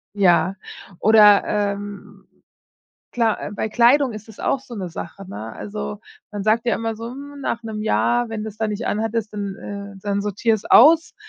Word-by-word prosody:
ja 190 0 +3 0.4
oder, 210 -1 +6
ähm, 205 -1 -4 0.9
klar, 230 -3 +1
äh, - - -5
bei 220 - -3
Kleidung 245 +3 +4
ist 215 0 -9
das 220 - -13
auch 275 - +1
so 255 -3 -11
'ne 190 -3 -4
Sache, 185 +3 -8
ne? 110 - -7
Also, 70 -9 -6 0.3
man 205 -1 -4
sagt 225 +2 +2
ja 235 - +2
immer 225 -1 -3
so: 230 +1 -6
„Mm, 285 +1 -10
nach 235 -2 -2
1 215 -1 -5
Jahr, 240 +2 +1
wenn 220 -1 -4
das 220 -1 -7
da 220 - 0
nicht 210 +2 -4
anhattest, 220 0 -2
dann 200 -2 -4
ähm, 200 -1 -7
dann 200 -1 -1
sortiere 210 +3 +1
es 210 - -12
aus,“ 320 +6 +6
210 Hz, 185 wpm, -21 LUFS, 200-230 Hz, 0.9 s, oder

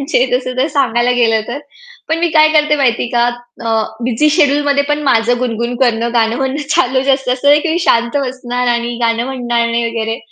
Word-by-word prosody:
म्हणजे 275 -2 +1
जसं 255 0 -2
तर 260 +3 +1
सांगायला 245 -4 +1
गेलं 225 -2 +2
तर. 245 - -4 0.5
पण 320 +1 0
मी 340 +1 +1
काय 310 -1 +5
करते 300 -1 +2
माहिती 255 -5 +1
आहे - - -3
का 240 -1 +2 0.4
अ, 225 -1 +1 0.2
बिझी 250 +5 +1
शेड्यूलमध्ये 285 -2 +2
पण 295 0 -1
माझं 245 -3 +2
गुणगुण 235 -1 -2
करणं 235 -1 0
गाणं 225 0 +1
म्हणणं 270 +2 -3
चालू 260 +1 +2
असतं 265 -2 -2
असं 260 +3 -1
नाही 295 +1 +5
की 335 - -3
मी 330 - 0
शांत 235 +3 +2
बसणार 250 -2 -3
आणि 235 0 -3
गाणं 230 0 +1
म्हणणार 240 -3 -1
नाही 235 0 -1
वगैरे 225 0 -3
250 Hz, 205 wpm, -14 LUFS, 235-285 Hz, 0.5 s, काय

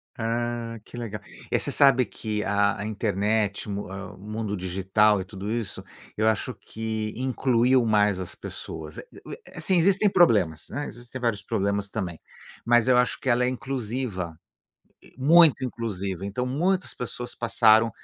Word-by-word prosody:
Ah, 115 0 -2
que - - -13
legal. 115 -3 -5 0.3
Eh, - - +2
você - - -1
sabe 135 -3 +5
que 105 -2 -4
a 100 0 +2
a 105 - -4
internet, 105 -1 0
o - - -4
mu 100 -1 -5
a 95 -1 -7
o - - -15
mundo 105 +1 -4
digital 95 +3 +2
e 95 - -4
tudo 100 +1 -6
isso, 115 -4 -4 0.3
eu 110 +1 +1
acho 110 -3 0
que 110 -1 -4
incluiu 130 -1 +2
mais 105 -3 +3
as 90 - -5
pessoas. 80 -1 -8
Eh - - -8 0.2
eh - - -8
eh, - - -10
sim, 190 - +2
existem 200 +4 +4
problemas, 95 - +3
né, 145 +2 -4
existem 120 +2 -8
vários 115 -4 0
problemas 100 0 -1
também, 90 -6 -4 0.4
mas 120 0 +4
eu 130 - +5
acho 125 0 +2
que - - -8
ela 120 0 +3
é - - +2
inclusiva, 120 -9 -4 0.8
muito 155 0 +6
inclusiva. 100 -6 -4
Então 100 +6 -2
muitas 180 +8 0
pessoas 120 0 -6
passaram 115 -1 +4
110 Hz, 165 wpm, -25 LUFS, 100-125 Hz, 0.8 s, muito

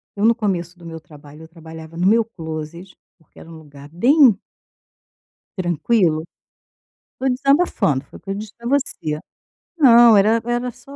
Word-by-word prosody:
eu 205 - -1
no 230 +1 +4
começo 185 -6 -3
do 170 - -16
meu 165 -1 -8
trabalho, 150 0 -16
eu - - -13
trabalhava 160 -1 -13
no 180 - -1
meu 225 +2 +3
closet, 165 -2 -9 0.2
porque 160 - -22
era 165 - -14
um 165 - -11
lugar 145 -2 -15
bem 245 - +4 1.2
tranquilo. 175 -2 0 1.0
Estou 265 - +1
desabafando, 255 - +1
foi - - -14
o - - -20
que 195 - -13
eu - - -1
disse 210 +1 -8
para 235 0 -8
você. 245 - -2 0.6
Não, 235 -6 +6
era 220 +3 +3
era 240 +1 -2
só 275 +4 -15
185 Hz, 165 wpm, -19 LUFS, 160-235 Hz, 1.2 s, Não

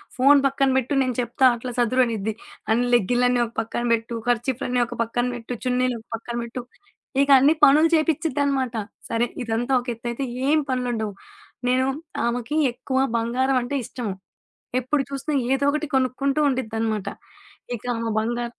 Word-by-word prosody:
"Phone 275 +2 +6
పక్కన 275 0 +1
పెట్టు, 265 +2 0
నేను 255 -2 -2
చెప్తా 240 +3 +1
అట్లా 245 +1 -6
సదురు" 255 +2 +3
అనిద్ది. 220 -2 -2 0.4
"అన్నిలెగ్గిన్లని 245 +1 +2
ఒక 225 - -10
పక్కన 230 +1 -4
పెట్టు, 230 +1 -2
ఖర్చిప్లన్ని 245 +1 0
ఒక - - -8
పక్కన 240 +2 -1
పెట్టు, 240 +1 -6
చున్నీళ్లు 250 -1 +1
ఒక - - -31
పక్కన 235 +1 -7
పెట్టు." 240 +1 -6 0.6
ఇక 280 - +1
అన్ని 290 +4 +5
పనులు 305 +4 +7
చేపించిద్దనమాట. 285 -5 0 0.3
సరే, 230 +1 +1 0.2
ఇదంతా 230 +3 -2
ఒక 250 - -15
ఎతైతే, 235 +3 -4 0.2
ఏం 310 +2 +4
పనులు 255 -1 -1
ఉండవు. 215 -3 -3 0.5
నేను 255 +1 +2 0.4
ఆమెకి 240 +4 -2 0.2
ఎక్కువ 260 +1 -2 0.2
బంగారం 255 +3 +1
అంటే 265 +4 -3
ఇష్టము. 225 -6 -4 0.7
ఎప్పుడు 270 +3 0
చూసినా, 275 +2 -3 0.2
ఏదో 270 +1 +1
ఒకటి 305 +1 -2
కొనుక్కుంటూ 270 +2 +1
ఉండిద్దనమాట. 225 -5 -2 0.7
ఇకా 240 +2 -9
ఆమ 230 0 -2
బంగా 240 +2 -1
245 Hz, 150 wpm, -23 LUFS, 230-270 Hz, 0.7 s, పనులు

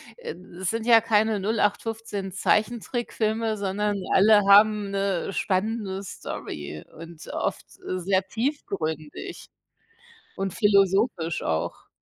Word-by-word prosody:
Äh, - - -7 0.2
das 185 -1 -2
sind 225 +1 -2
ja 230 -1 +7
keine 220 -1 +2
08/15 210 -1 -1
Zeichentrickfilme, 220 +1 0
sondern 205 +1 -1 0.2
alle 205 +2 +6
haben 205 0 +6
'ne 195 -1 -1
spannende 195 0 -1
Story 75 - -7
und 165 0 -11
oft, - - -2 0.2
äh, 185 - -2
sehr 190 +1 +1
tiefgründig 190 - -4 0.9
und 195 -2 -3
philosophisch 195 -4 +2
auch. 80 +1 -3
200 Hz, 105 wpm, -25 LUFS, 190-220 Hz, 0.9 s, ja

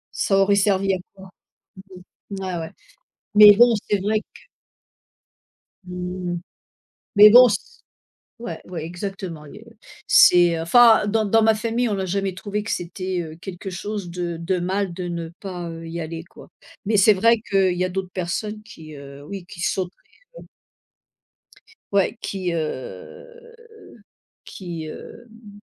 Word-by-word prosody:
ça 195 - +1
aurait 200 +1 +3
servi 195 -1 +2
à - - 0 0.2
quoi? 190 -1 -14 1.0
Ouais, 190 -2 -4
ouais, 160 0 -6 0.7
mais 210 -1 +9
bon 240 0 +6 0.2
c'est 205 -2 +1
vrai 215 +2 0
que - - -20 1.4
Mmh. 180 -1 -5 0.8
Mais 210 +1 +10
bon 250 +2 +9
s 475 - -5 0.6
ouais, 175 -9 -7
ouais 170 -3 -7
exactement, 175 -3 -7
et 210 +9 -13
heu 225 - -19 0.3
c'est 175 -2 +5
enfin 220 +6 +5
dans 220 +1 +1
dans 225 +2 +3
ma 220 0 +4
famille, 230 +2 -1
on - - 0
n'a 190 -1 -3
jamais 195 0 -2
trouvé 205 +2 -4
que 225 - -6
c'était, 180 +1 -3
heu, 160 -1 -7
quelque 190 0 -8
chose 200 +1 -5
de 170 -1 -4
de 180 +2 -1
mal 190 +1 -2
de 180 0 -6
ne 170 -1 -5
pas, 180 -3 -6
heu, 165 0 -9
y 170 +1 -6
aller 165 +1 -6
quoi. - - -16 0.4
Mais 215 0 +2
c'est 205 +2 +6
vrai 230 +4 +3
qu'il 190 -2 +2
y 180 - 0
a 185 - -2
d'autres 190 0 -4
personnes 210 +4 -4
qui, 160 -8 -13
heu, 140 0 -12
oui 195 -1 -7
qui 175 - -11
sauteraient, 180 +1 -2 0.4
heu - - -13 1.5
Ouais, 200 +3 +1
qui 185 -3 -3
heu 465 - -7 0.9
qui, 170 -4 -7
hem 215 +4 -12
190 Hz, 150 wpm, -22 LUFS, 175-210 Hz, 1.5 s, Mais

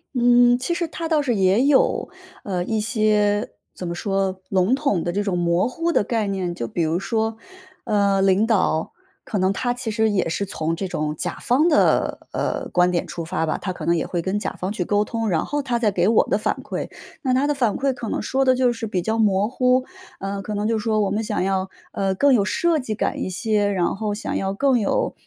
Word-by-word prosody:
嗯， 245 0 +5
其 265 +7 -2
实 340 -1 -1
他 330 +1 -5
倒 310 -2 +2
是 245 -5 0
也 195 +5 +3
有， 285 -2 +3 0.3
呃， 180 -3 -2
一 220 -1 -1
些 210 -2 +1 0.2
怎 180 - -6
么 170 - -3
说， 195 0 -2
笼 190 +5 +2
统 265 - +1
的 175 - -1
这 205 +3 -1
种 190 -3 -1
模 175 +3 +2
糊 330 +7 -1
的 210 - +2
概 225 -1 -1
念。 185 -3 -2
就 115 - -4
比 170 - -3
如 165 +2 +1
说， 220 +1 -1 0.5
呃， 200 -2 +2
领 195 +3 +3
导， 185 -7 +1 0.3
可 210 - -3
能 190 +1 +2
他 245 +4 -1
其 245 -2 -3
实 220 0 +2
也 195 -4 0
是 200 +5 -2
从 165 -2 -2
这 190 +2 -3
种 150 -3 -2
甲 - - -3
方 295 +8 +3
的， 300 - +2
呃， - - -2
观 180 0 +3
点 175 -1 -1
出 170 - -6
发 160 0 -2
吧， 155 - -2
他 185 - -3
可 - - -7
能 170 - +3
也 160 - -1
会 175 - -2
跟 195 +2 -1
甲 - - -3
方 185 +2 -2
去 190 -4 -2
沟 205 +3 +1
通， 225 -1 -2
然 160 -3 0
后 290 0 -2
他 245 -3 -1
再 220 -3 +1
给 180 0 +1
我 225 - +4
的 - - +1
反 - - -1
馈。 - - -4 0.3
那 260 -4 0
他 275 +2 +2
的 295 - +1
反 240 -7 +1
馈 270 -1 0
可 235 -3 -6
能 - - -1
说 265 +5 0
的 255 -1 +4
就 250 -1 +2
是 225 -1 -5
比 180 -4 -2
较 220 +2 -1
模 205 -1 +3
糊， 255 +1 +2 0.3
呃， 195 0 -4
可 210 +1 -5
能 210 +1 -1
就 225 -1 +1
说： 215 0 +1
“我 195 - -2
们 215 +2 -1
想 195 - -1
要， 190 0 -1 0.2
呃， 195 -1 -1
更 280 +5 +4
有 210 -5 +4
设 325 +9 +1
计 220 -5 -4
感 - - -2
一 - - -2
些， 210 +1 0
然 180 -1 0
后 210 0 -2
想 215 - -4
要 195 0 -1
更 265 0 +2
有 200 - 0
210 Hz, 255 characters per minute, -22 LUFS, 190-245 Hz, 0.5 s, 嗯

